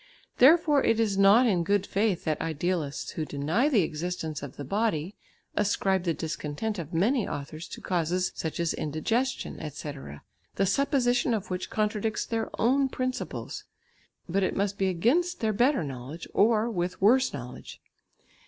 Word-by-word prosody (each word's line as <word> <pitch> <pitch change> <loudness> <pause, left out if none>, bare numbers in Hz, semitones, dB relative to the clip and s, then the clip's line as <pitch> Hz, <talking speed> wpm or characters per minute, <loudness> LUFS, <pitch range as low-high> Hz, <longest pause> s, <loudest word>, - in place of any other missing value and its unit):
Therefore 300 +1 +6
it 225 0 +2
is 215 -3 +1
not 200 +5 +6
in 185 -7 +2
good 200 +2 +1
faith 200 -3 0
that 155 -2 -1
idealists 160 -2 -2
who 160 - -3
deny 155 - 0
the 225 - +4
existence 160 -1 -4
of 140 -2 -8
the 145 - -5
body, 195 - -1 0.4
ascribe 195 -2 +1
the 170 - +1
discontent 160 +6 -3
of 165 -1 -6
many 215 +8 +1
authors 155 +4 -6
to - - -9
causes 180 +1 0
such 160 +1 -4
as 170 -1 +1
indigestion, 225 - -2
etc., 140 - -7 0.3
the 195 - +2
supposition 245 +1 +2
of 205 -2 -5
which 180 0 -3
contradicts 215 0 -1
their 225 -1 -2
own 265 +4 +3
principles, 255 0 -4 0.6
but 190 +3 0
it 185 - 0
must 200 0 -1
be 195 - +2
against 280 - +1
their 220 -1 0
better 245 - +2
knowledge, 135 +4 -7
or 220 +1 +3
with 180 -5 -2
worse 250 +7 +4
knowledge. 125 -3 -8
195 Hz, 155 wpm, -28 LUFS, 160-230 Hz, 0.6 s, Therefore